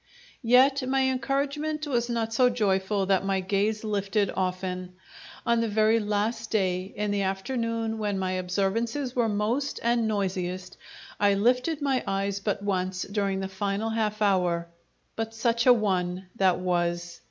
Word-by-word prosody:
Yet 265 +3 +5
my 270 0 +2
encouragement 285 +4 -1
was 240 -4 0
not 225 -1 -1
so 250 +2 +4
joyful 200 -3 +1
that 190 0 +2
my 195 -1 0
gaze 205 +3 0
lifted 200 -1 0
often. 185 -1 -3 0.5
On 235 0 +3
the 230 - 0
very 220 +1 +3
last 215 +2 -1
day, 185 -2 0
in 210 0 -1
the 205 -1 0
afternoon 225 +3 -2
when 205 -2 -1
my 185 -1 -1
observances 205 +8 -1
were 235 -3 +2
most 225 +7 -1
and 235 -1 +2
noisiest, 185 -3 -2 0.4
I 200 -1 +4
lifted 250 +8 +1
my 270 -3 +1
eyes 195 0 -1
but 200 0 -2
once 185 -2 -1
during 200 -1 -1
the 190 - -2
final 200 +3 -2
half 215 -1 -1
hour 180 -4 +2 0.5
but 225 0 -4
such 230 +1 +1
a 250 - +10
one 185 -4 -1
that 190 -3 +3
was! 175 -1 -1
205 Hz, 155 wpm, -27 LUFS, 190-230 Hz, 0.5 s, a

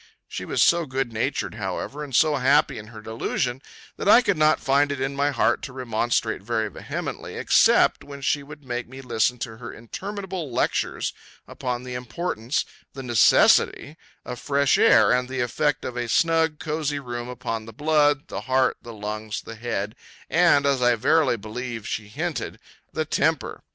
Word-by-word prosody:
She - - -6
was - - +2
so 170 -2 +3
good 130 -2 -2
natured, 110 - -2
however, 150 +1 -4
and 135 -4 -5
so 155 +1 +4
happy 135 +1 +3
in 105 - -10
her 110 -1 -11
delusion, 120 +3 -2 0.4
that - - -1
I 245 - +8
could 200 -4 +2
not 155 0 +3
find 140 +1 +2
it 140 - -3
in 135 +1 -2
my 140 +1 +1
heart 135 -5 +1
to 130 - -7
remonstrate 120 -3 -1
very 110 +1 -1
vehemently, - - -6
except - - +4
when 140 -1 -10
she 145 +2 +1
would 145 +1 -12
make 120 -1 -4
me 130 +1 -9
listen 120 -1 0
to 115 -2 -6
her 120 0 -8
interminable 190 - -6
lectures - - -1 0.3
upon 125 -1 -4
the 125 0 -7
importance, 125 0 -2 0.3
the 135 - -7
necessity, 125 +4 +4 0.3
of 125 -1 -6
fresh 140 -1 +2
air, 105 -2 +6
and 125 0 +1
the 130 -1 -2
effect 140 +4 0
of 125 - -5
a 120 -1 -3
snug, 160 +2 +2
cosy 150 -2 -2
room 120 -3 -5
upon 115 -3 -4
the - - -8
blood, 145 +2 +2
the - - -5
heart, 130 0 +1
the 120 - -10
lungs, 105 +1 -5
the - - -8
head, 110 -3 -3 0.4
and 165 -5 +4
(as 140 -2 +2
I 120 -1 +4
verily 140 +1 +2
believe 115 +1 -6
she 105 -1 -4
hinted) 105 - -4 0.3
the - - -2
temper. - - 0
130 Hz, 175 wpm, -24 LUFS, 115-145 Hz, 0.4 s, I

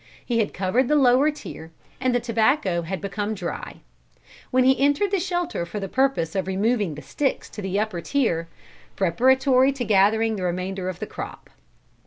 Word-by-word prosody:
He 235 -2 0
had 215 - 0
covered 200 +7 +1
the 300 - +2
lower 270 +1 +5
tier 290 - -8 0.3
and 255 -1 +1
the - - +3
tobacco 220 - +1
had 170 +1 -5
become 205 +2 -3
dry; 180 -4 -6 0.7
when 255 0 +3
he 265 +1 +4
entered 290 +8 +2
the 395 - +2
shelter 350 - -2
for 190 +5 -5
the 195 - -4
purpose 260 -8 0
of 190 -1 -2
removing 200 -2 0
the 150 - -9
sticks 270 - -2
to 210 - -7
the 190 +1 -1
upper 210 -5 -2
tier, 170 -10 0 0.5
preparatory 260 +8 +3
to 255 -3 -4
gathering 220 +2 +3
the 185 - -4
remainder 185 +1 -2
of 185 - -5
the - - -5
crop. - - -8
220 Hz, 180 wpm, -24 LUFS, 185-265 Hz, 0.7 s, lower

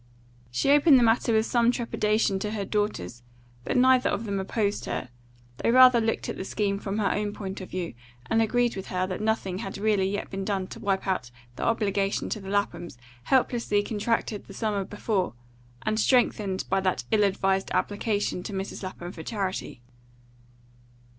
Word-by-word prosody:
She 125 - +1
opened 290 -1 +7
the 245 - +4
matter 230 +1 +3
with 220 0 +3
some 235 -1 +3
trepidation 215 -4 +1
to 210 +2 -3
her 205 -2 -2
daughters, 205 - -2 0.4
but - - -1
neither 255 0 +5
of 225 - -2
them 200 -2 -2
opposed 205 +1 -1
her; 125 - -4 0.5
they - - 0
rather 250 -1 +7
looked 225 0 -1
at - - -4
the - - -4
scheme 200 0 -1
from 200 0 -3
her 210 -2 +1
own 210 0 -1
point 195 -2 -6
of 185 - -8
view, 180 -5 -4 0.3
and 225 +9 +2
agreed 240 +2 +1
with 190 0 -6
her 185 0 -1
that 185 +1 -4
nothing 215 -4 -1
had 195 - -5
really 205 -2 +2
yet 205 +1 -4
been 195 0 -3
done 195 -2 -1
to - - -9
wipe 195 -1 -1
out 180 -11 -1 0.3
the - - -7
obligation 200 -3 0
to 215 - -3
the 195 -1 -8
Laphams 195 -7 -2 0.3
helplessly 235 -5 +2
contracted 215 0 -1
the 195 - -11
summer 210 -3 -1
before, 195 - -2 0.5
and 215 0 0
strengthened 210 -6 +2
by - - +1
that 185 -1 0
ill 215 -1 +4
advised 195 -1 +1
application 205 -2 -1
to 200 - -6
Mrs. 195 0 -4
Lapham 185 -2 -6
for 165 - -9
charity. 190 - -4
205 Hz, 180 wpm, -27 LUFS, 190-225 Hz, 0.5 s, opened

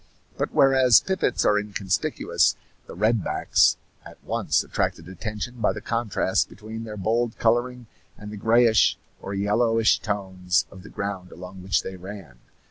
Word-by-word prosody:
But - - -2
whereas 130 -4 +5
pipits 190 -1 -1
are 105 - +4
inconspicuous, 100 -2 0 0.3
the - - -10
red 110 +2 +1
backs - - +2 0.3
at - - -13
once - - 0
attracted 80 - -3
attention 110 +5 -6
by - - +2
the 105 - -6
contrast 115 -4 -1
between 110 +1 -8
their 105 -1 -7
bold 115 +3 -1
coloring 120 +2 0 0.3
and 105 0 -9
the 105 - -7
grayish 115 +1 +4 0.2
or 100 - -5
yellowish 115 +3 +2
tones 95 -5 -1
of 95 - -12
the - - -13
ground 100 -2 -5
along 90 +2 -10
which 95 +1 0
they 95 - -7
ran. 90 -9 -10
105 Hz, 150 wpm, -24 LUFS, 95-115 Hz, 0.3 s, whereas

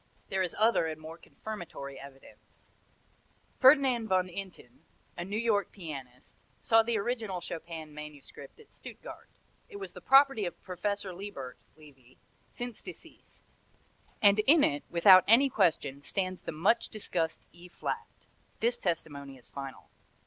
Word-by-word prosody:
There 190 -1 0
is 180 -2 -1
other 220 -6 +3
and 155 -1 -5
more 160 +2 -10
confirmatory 170 -10 -8
evidence. 135 -1 -16 0.9
Ferdinand 260 -4 +5
Von 185 -2 +1
Inten, 180 -10 -9 0.4
a 175 - -4
New 200 +4 -4
York 220 -3 +1
pianist, 135 -9 -9 0.2
saw 225 0 +5
the 225 0 0
original 215 -3 -2
Chopin 160 -2 -7
manuscript 150 - -11
at 450 - -18
Stuttgart. - - -11 0.4
It 420 - -12
was 400 -1 -6
the - - -10
property 270 -7 +5
of - - -8
Professor 195 +1 -3
Lebert 175 -10 -8 0.2
(Levy), 135 -5 -18 0.3
since 245 -2 -5
deceased, 370 - -13 0.8
and 205 0 +6
in 300 +1 +7
it, 145 0 +1
without 185 +2 +8
any 260 +6 +6
question, 150 -9 +1
stands 185 +3 -3
the - - -5
much 180 +9 +2
discussed 175 -6 -2
E 175 +1 -14
flat. 180 - -4 0.5
This 235 +2 +1
testimony 140 -6 -3
is 125 - -19
final. 135 -1 -9
185 Hz, 140 wpm, -30 LUFS, 155-220 Hz, 0.9 s, without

